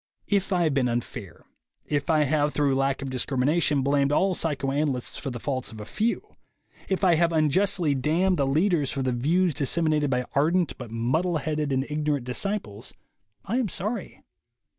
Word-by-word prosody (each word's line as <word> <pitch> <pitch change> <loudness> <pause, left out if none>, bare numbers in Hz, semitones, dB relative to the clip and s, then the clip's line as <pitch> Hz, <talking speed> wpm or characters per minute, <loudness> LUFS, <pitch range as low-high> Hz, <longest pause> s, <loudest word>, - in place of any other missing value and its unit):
If 200 -1 0
I 180 -2 +2
have 155 -3 +1
been 135 -2 +2
unfair, 115 -6 -5 0.4
if 145 +3 -2
I 155 -2 +4
have 150 +1 0
through 145 -2 +2
lack 135 +1 0
of 135 - -5
discrimination 140 +3 +1
blamed 140 0 +2
all 190 +5 +2
psychoanalysts 140 -4 -1
for 140 - -4
the 120 -2 -6
faults 130 -1 -3
of 110 - -10
a 105 - -7
few, 220 - -2 0.5
if 190 0 -1
I 180 -2 +5
have 170 +1 +2
unjustly 165 +1 +2
damned 165 +8 +1
the 140 - +1
leaders 155 0 +2
for 135 - -2
the 130 - 0
views 160 +8 +1
dissem 155 +4 +1
inated 150 -2 +1
by 125 -1 0
ardent 165 +4 +1
but 125 -3 -7
muddle 155 +10 0
headed 150 -1 -2
and 135 0 0
ignorant 150 -3 -1
disciples, 125 - -3 0.5
I 230 - -1
am 235 -6 -1
sorry. 210 +7 -3
150 Hz, 180 wpm, -25 LUFS, 135-170 Hz, 0.5 s, I